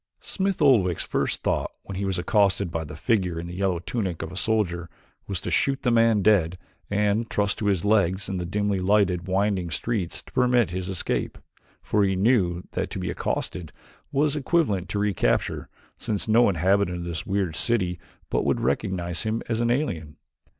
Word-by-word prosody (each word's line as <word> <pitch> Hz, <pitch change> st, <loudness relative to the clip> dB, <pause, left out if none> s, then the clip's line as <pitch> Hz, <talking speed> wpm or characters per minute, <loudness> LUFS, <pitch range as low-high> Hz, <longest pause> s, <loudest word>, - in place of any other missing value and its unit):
Smith 195 Hz, -3 st, -1 dB
Oldwick's 100 Hz, -, +4 dB
first -, -, -1 dB
thought -, -, 0 dB
when 100 Hz, -, -7 dB
he 100 Hz, +1 st, -2 dB
was 95 Hz, -1 st, -1 dB
accosted 100 Hz, 0 st, +2 dB
by 80 Hz, -1 st, -2 dB
the 75 Hz, 0 st, -9 dB
figure 90 Hz, -2 st, 0 dB
in 85 Hz, -, -5 dB
the 85 Hz, -, -7 dB
yellow 95 Hz, -1 st, 0 dB
tunic 95 Hz, -1 st, -3 dB
of 80 Hz, -, -6 dB
a -, -, -8 dB
soldier 90 Hz, -5 st, 0 dB, 0.4 s
was 95 Hz, -3 st, -3 dB
to -, -, -5 dB
shoot 135 Hz, -1 st, +1 dB
the 125 Hz, -, +2 dB
man 115 Hz, -3 st, +4 dB
dead 90 Hz, -4 st, +3 dB, 0.3 s
and 105 Hz, +2 st, +1 dB
trust 105 Hz, -1 st, 0 dB
to 105 Hz, -, -1 dB
his 95 Hz, -2 st, +1 dB
legs 95 Hz, -3 st, +2 dB
and 95 Hz, -2 st, -3 dB
the -, -, -3 dB
dimly 105 Hz, +1 st, 0 dB
lighted, 95 Hz, -2 st, +2 dB
winding 95 Hz, -2 st, 0 dB
streets 90 Hz, +2 st, -3 dB
to -, -, -18 dB
permit 125 Hz, -5 st, +3 dB
his 90 Hz, +1 st, -4 dB
escape, 95 Hz, -3 st, -2 dB, 0.5 s
for 105 Hz, -1 st, +2 dB
he 95 Hz, -1 st, +2 dB
knew 95 Hz, -4 st, +2 dB
that -, -, -2 dB
to -, -, -5 dB
be 90 Hz, -2 st, -2 dB
accosted 85 Hz, -2 st, -3 dB, 0.4 s
was 145 Hz, +1 st, +2 dB
equivalent 135 Hz, -, 0 dB
to 105 Hz, -, -2 dB
recapture 100 Hz, -2 st, 0 dB, 0.3 s
since 110 Hz, -3 st, -2 dB
no 115 Hz, +1 st, +5 dB
inhabitant 95 Hz, +1 st, +1 dB
of 85 Hz, -, -5 dB
this 85 Hz, -1 st, -5 dB
weird 95 Hz, -4 st, -1 dB
city 90 Hz, -7 st, +1 dB, 0.3 s
but -, -, +1 dB
would -, -, +1 dB
recognize 85 Hz, -, -1 dB
him 110 Hz, +1 st, -2 dB
as 115 Hz, 0 st, 0 dB
an 120 Hz, -, +1 dB
alien. 85 Hz, -, -2 dB
95 Hz, 185 wpm, -25 LUFS, 90-110 Hz, 0.5 s, no